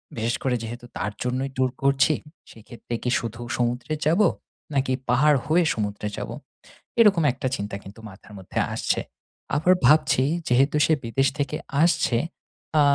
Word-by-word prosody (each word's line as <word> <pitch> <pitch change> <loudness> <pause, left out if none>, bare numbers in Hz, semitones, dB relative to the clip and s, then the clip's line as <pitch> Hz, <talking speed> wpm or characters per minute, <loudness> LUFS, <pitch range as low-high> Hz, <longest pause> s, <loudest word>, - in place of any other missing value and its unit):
বিশেষ 115 +1 -1
করে 130 -2 +1
যেহেতু 120 +2 -7
তার 100 +4 -2
জন্যই 130 +2 -2
ট্যুর 130 -1 +1
করছি, 140 +2 +4 0.4
সেক্ষেত্রে 115 +1 -10
কি 125 - 0
শুধু 115 0 -6 0.2
সমুদ্রে 125 +4 -1
যাব? 170 +7 +3 0.5
নাকি 135 -2 +1 0.2
পাহাড় 145 +3 +4
হয়ে 165 +3 +3
সমুদ্রে 105 -1 -3
যাব? - - -5 0.7
এরকম 200 -7 +5
একটা 130 +1 -3
চিন্তা 100 -4 -5
কিন্তু 100 +3 -12
মাথার 95 +2 -15
মধ্যে 95 - -4
আসছে। - - 0 0.5
আবার 180 +5 +4
ভাবছি 140 -1 +4 0.2
যেহেতু 135 +4 +3
সে 160 - +3
বিদেশ 135 +4 +1
থেকে 145 +2 -1 0.3
আসছে 165 -8 +2 0.6
আ - - +6
130 Hz, 150 wpm, -24 LUFS, 115-150 Hz, 0.7 s, আ